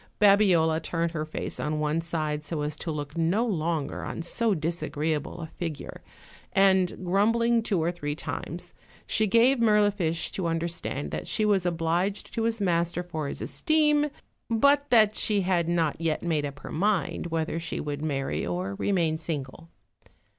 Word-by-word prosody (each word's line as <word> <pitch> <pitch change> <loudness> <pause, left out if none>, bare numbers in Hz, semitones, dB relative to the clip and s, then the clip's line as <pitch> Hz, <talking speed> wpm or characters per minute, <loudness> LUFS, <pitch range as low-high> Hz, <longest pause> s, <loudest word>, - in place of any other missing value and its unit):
Babiola 185 -6 +4
turned 165 +1 -1
her 155 -2 -3
face 155 - -4
on 150 0 -1
one 150 +2 0
side 155 -3 -2
so 155 -1 -3
as 150 0 -3
to 165 - -5
look 150 -1 -4
no 170 +8 +1
longer 165 - -2
on 170 - -5
so 220 +4 +1
disagreeable 160 -1 -2
a - - -3
figure, 160 -1 -6 0.5
and, 190 -1 +3
grumbling 230 +5 +3
two 195 -7 0
or 170 - +1
three 145 -4 -4
times, - - -5 0.3
she 220 - +1
gave 235 +5 +4
Mirlifiche 205 -7 +2
to 185 -3 -2
understand 165 -3 -2
that - - -4
she 215 - +1
was 195 -4 +2
obliged 175 +4 -1
to 225 -1 -1
his 230 0 0
master 175 -2 0
for 160 -4 -4
his - - -4
esteem, 300 -2 +2 0.4
but 280 +5 +3
that 215 -3 +5
she 210 -2 +2
had 180 -3 +1
riot 165 -3 +1
yet 165 -2 -1
made 155 -4 0
up 140 +1 -10
her - - -8
mind 190 0 0
whether 165 0 -2
she 165 -1 -4
would 145 -1 -4
marry 140 -3 -2
or 90 +2 -2
remain 165 -5 +1
single. 160 0 -5
170 Hz, 165 wpm, -27 LUFS, 155-205 Hz, 0.5 s, that